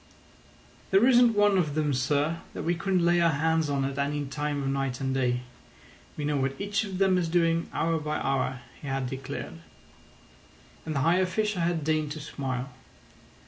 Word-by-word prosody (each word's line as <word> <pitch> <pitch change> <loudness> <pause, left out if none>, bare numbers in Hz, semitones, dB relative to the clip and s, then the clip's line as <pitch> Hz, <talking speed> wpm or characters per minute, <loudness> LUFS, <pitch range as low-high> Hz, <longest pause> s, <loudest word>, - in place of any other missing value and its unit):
"There 195 +4 +5
isn't 240 -3 +5
one 205 -2 +4
of 150 -5 -1
them, 150 -2 +1
sir, 145 +5 0 0.2
that - - -4
we 170 - +1
couldn't 180 0 0
lay 175 0 +4
our 170 - +4
hands 160 +1 +1
on 140 -1 0
at 135 +1 -3
any 145 +1 -1
time 145 0 -3
of 135 - -1
night 135 -2 -1
and 135 -1 -1
day. 125 -2 +1 0.8
We 150 - -2
know 145 0 0
what 135 0 -1
each 200 +1 0
of 195 -3 -5
them 190 -1 +3
is 170 -2 -1
doing 165 -1 +1
hour 165 -1 0
by 150 0 -2
hour," 135 -1 -1 0.2
he 145 - -8
had 135 -1 -1
declared. 130 - -6 1.3
And 155 - -2
the 135 - +1
high 165 +5 +3
official 195 +1 0
had 165 -2 0
deigned 155 -1 0
to 155 - -7
smile. 135 -2 -4
150 Hz, 185 wpm, -27 LUFS, 135-175 Hz, 1.3 s, There